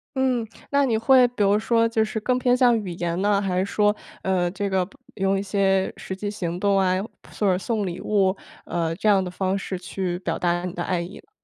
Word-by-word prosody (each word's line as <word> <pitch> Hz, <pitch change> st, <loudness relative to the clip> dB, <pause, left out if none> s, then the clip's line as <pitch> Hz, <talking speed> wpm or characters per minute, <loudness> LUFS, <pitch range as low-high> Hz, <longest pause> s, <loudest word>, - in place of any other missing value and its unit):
嗯， 255 Hz, -4 st, +1 dB, 0.2 s
那 280 Hz, 0 st, +3 dB
你 225 Hz, -3 st, +1 dB
会 255 Hz, +2 st, +5 dB
比 240 Hz, -4 st, -1 dB
如 205 Hz, +1 st, +3 dB
说 230 Hz, +1 st, +2 dB
就 225 Hz, -1 st, +1 dB
是 220 Hz, +1 st, -3 dB
更 250 Hz, +3 st, 0 dB
偏 250 Hz, -1 st, +3 dB
向 245 Hz, -2 st, +4 dB
语 185 Hz, -, -5 dB
言 170 Hz, 0 st, -2 dB
呢， 205 Hz, 0 st, +3 dB
还 185 Hz, -2 st, 0 dB
是 190 Hz, -, +1 dB
说， 210 Hz, +1 st, +2 dB, 0.3 s
呃， 180 Hz, -2 st, +1 dB
这 200 Hz, +2 st, -3 dB
个 190 Hz, -1 st, +1 dB
不 275 Hz, -, -20 dB, 0.2 s
用 195 Hz, 0 st, +1 dB
一 195 Hz, -, -2 dB
些 195 Hz, -1 st, +1 dB
实 190 Hz, -, -6 dB
际 205 Hz, +2 st, -4 dB
行 175 Hz, -4 st, -4 dB
动 200 Hz, 0 st, +2 dB
啊， 185 Hz, -1 st, +3 dB
又 190 Hz, -, -1 dB, 0.3 s
或 210 Hz, -, 0 dB
者 180 Hz, -, +1 dB
送 210 Hz, +1 st, -2 dB
礼 180 Hz, 0 st, -5 dB
物 195 Hz, -2 st, +2 dB, 0.3 s
呃， 165 Hz, -1 st, -2 dB
这 215 Hz, -, -2 dB
样 195 Hz, -2 st, +5 dB
的 180 Hz, -, -4 dB
方 190 Hz, +1 st, -1 dB
式 190 Hz, -1 st, -4 dB
去 180 Hz, 0 st, -3 dB
表 170 Hz, -3 st, -2 dB
达 175 Hz, 0 st, 0 dB
你 180 Hz, -, -4 dB
的 175 Hz, -, -5 dB
爱 180 Hz, -2 st, -1 dB
意 180 Hz, +4 st, -8 dB
呢？ -, -, -17 dB
195 Hz, 260 characters per minute, -24 LUFS, 185-220 Hz, 0.3 s, 会